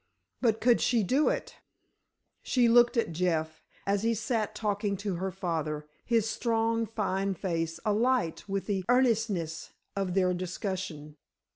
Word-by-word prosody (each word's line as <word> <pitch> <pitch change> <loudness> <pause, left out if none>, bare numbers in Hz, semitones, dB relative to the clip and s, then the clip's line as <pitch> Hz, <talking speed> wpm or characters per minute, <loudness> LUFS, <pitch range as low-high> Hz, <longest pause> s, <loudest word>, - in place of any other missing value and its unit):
But 225 -3 +2
could 240 -1 +4
she 235 -3 +2
do 270 +11 +3
it? - - -3 0.8
She 245 -2 +2
looked 240 +1 +5
at 230 - +1
Jeff, 160 -2 -1 0.2
as 200 0 +1
he 230 +1 +1
sat 220 0 -1
talking 205 -1 -1
to 200 -2 -3
her 190 +2 -2
father, 160 -5 -3 0.2
his 230 -2 +2
strong, 230 0 0
fine 195 -2 -1
face 165 -3 -2
alight 215 -4 +1
with 195 0 -1
the 195 -3 -1
earnestness 225 -10 +1 0.2
of 190 -2 -1
their 185 -1 +3
discussion. 180 -4 -4
200 Hz, 140 wpm, -29 LUFS, 180-230 Hz, 0.8 s, looked